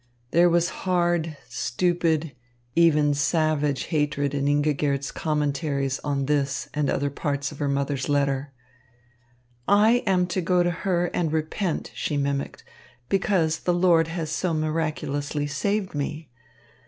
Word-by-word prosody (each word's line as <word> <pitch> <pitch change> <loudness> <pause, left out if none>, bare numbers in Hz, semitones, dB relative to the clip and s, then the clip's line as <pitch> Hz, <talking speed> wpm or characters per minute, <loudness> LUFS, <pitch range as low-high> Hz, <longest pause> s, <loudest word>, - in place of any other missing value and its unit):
There 175 +1 +5
was 170 +1 +2 0.2
hard, 175 -3 +1
stupid, 160 +3 0 0.4
even 150 -3 +4
savage 150 -1 +1
hatred 145 -3 -1
in 140 -1 -1
Ingigerd's 145 -1 +1
commentaries 145 -3 -1
on 140 -2 -1
this 140 -1 0
and 150 -2 0
other 140 0 0
parts 140 0 -2
of 150 - -11
her 145 - 0
mother's 140 -1 -1
letter. 140 -1 0 1.2
"I 215 +4 +5
am 185 -2 +3
to 180 +1 -2
go 180 +1 +2
to 175 - +1
her 175 -1 -1
and 165 -3 0
repent," 160 +3 -2
she 145 - -2
mimicked, 140 -1 -2 0.5
"because 180 -5 +1
the 175 - 0
Lord 175 -2 +4
has 165 -2 -4
so 170 0 -1
miraculously 155 -2 -2
saved 190 +7 -1
me. 150 0 -4
155 Hz, 130 wpm, -25 LUFS, 145-175 Hz, 1.2 s, There